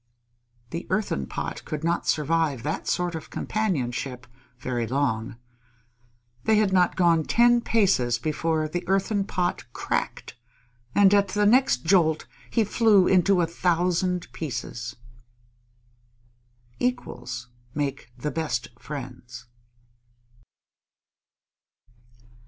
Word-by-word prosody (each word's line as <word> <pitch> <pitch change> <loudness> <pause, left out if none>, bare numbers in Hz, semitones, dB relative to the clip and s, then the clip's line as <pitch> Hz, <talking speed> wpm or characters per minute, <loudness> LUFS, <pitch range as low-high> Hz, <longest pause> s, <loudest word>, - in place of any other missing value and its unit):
The 170 +1 -5
Earthen 185 - -1
Pot - - -5
could 155 -1 -5
not 170 +1 0
survive 155 -4 +1
that 155 - -3
sort 175 -1 0
of 160 -1 -7
companionship 130 - -2 0.3
very 120 -2 -2
long. 115 -4 -1 1.1
They 220 - +4
had 210 -3 +2
not 180 -2 +3
gone 170 -3 +3
ten 240 +6 +4
paces 190 - +2
before 155 +4 -1
the 175 +3 -3
Earthen 195 +1 +1
Pot 175 - -2
cracked, - - -3 0.6
and 200 -1 +6
at 200 -1 +4
the 205 +2 +1
next 230 - +4
jolt 160 -3 +3 0.2
he 230 - +2
flew 210 -2 +4
into 185 0 +4
a - - +3
thousand 180 +1 0
pieces. 125 -4 -5 1.8
_Equals 125 - -3 0.3
make 140 -4 -3
the 150 +4 -3
best 125 -7 -2
friends. 125 -4 -8
165 Hz, 105 wpm, -25 LUFS, 130-190 Hz, 1.8 s, and